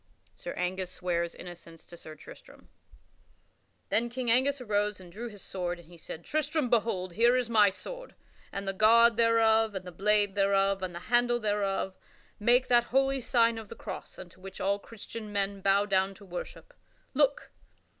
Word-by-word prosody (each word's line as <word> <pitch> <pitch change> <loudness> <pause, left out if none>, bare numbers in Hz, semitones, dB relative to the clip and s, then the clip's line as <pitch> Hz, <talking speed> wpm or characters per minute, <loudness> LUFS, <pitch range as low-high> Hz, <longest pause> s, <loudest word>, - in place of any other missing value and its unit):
[Sidenote: - - -7
King - - -1
Angus 185 0 -5
swears 170 -2 -2
innocence 170 -2 -11
to 175 - -12
Sir 155 -2 -10
Tristram] 155 - -15 1.2
Then 235 +1 +1
King 245 -1 -1
Angus 270 +4 +2
arose 210 -4 -1
and 180 -2 -13
drew 225 +6 -6
his 205 -4 -11
sword 175 -2 -4
and 170 -1 -16
he 175 - -14
said: 160 +1 -9
"Tristram, 305 -3 -1
behold; 205 -6 0
here 235 +5 +4
is 245 -2 -2
my 210 -3 +6
sword - - -9 0.4
and 195 0 -5
the 195 - -1
guard 230 +3 +6
thereof 225 -2 +3
and 185 -1 -5
the 180 - -7
blade 205 +2 +2
thereof 195 0 +2
and 180 -2 -4
the 175 - -6
handle 240 0 +3
thereof 200 -3 -1 0.4
make 240 +4 +4
that 240 -1 +4
holy 270 +1 +1
sign 230 -2 +2
of 220 -3 -11
the - - -8
cross - - -8
unto 185 0 -12
which 195 0 -9
all 200 +1 0
Christian 220 0 -9
men 200 -1 -2
bow 200 +1 +3
down 195 -1 +1
to 200 - -15
worship. 180 - -8 0.4
Look! 285 0 +1
205 Hz, 180 wpm, -29 LUFS, 190-235 Hz, 1.2 s, my